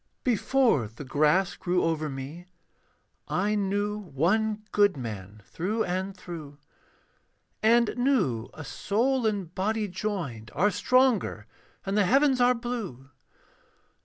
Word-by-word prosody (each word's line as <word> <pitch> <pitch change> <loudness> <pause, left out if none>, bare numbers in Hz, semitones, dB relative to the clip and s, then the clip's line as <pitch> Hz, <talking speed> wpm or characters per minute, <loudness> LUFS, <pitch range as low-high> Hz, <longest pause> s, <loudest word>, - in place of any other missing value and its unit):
Before 240 - +2
the 115 +7 -10
grass 150 +7 +2
grew 180 0 0
over 155 -2 0
me, 140 +6 -7 0.8
I 205 +3 0
knew 205 +1 -1
one 210 +6 0
good 205 -6 +3
man 105 -4 -7
through 210 - -2
and 185 +2 -3
through, 155 -6 -8 1.0
And 230 +1 +4
knew 205 - +1
a 155 - -8
soul 240 - 0
and 195 -5 -2
body 210 +3 -1
joined 180 - -4
Are 205 +2 +3
stronger 250 - +2 0.4
than 195 - -2
the 205 -1 +3
heavens 270 +3 +4
are 250 +1 +5
blue. 220 - -5
195 Hz, 120 wpm, -27 LUFS, 150-220 Hz, 1.0 s, are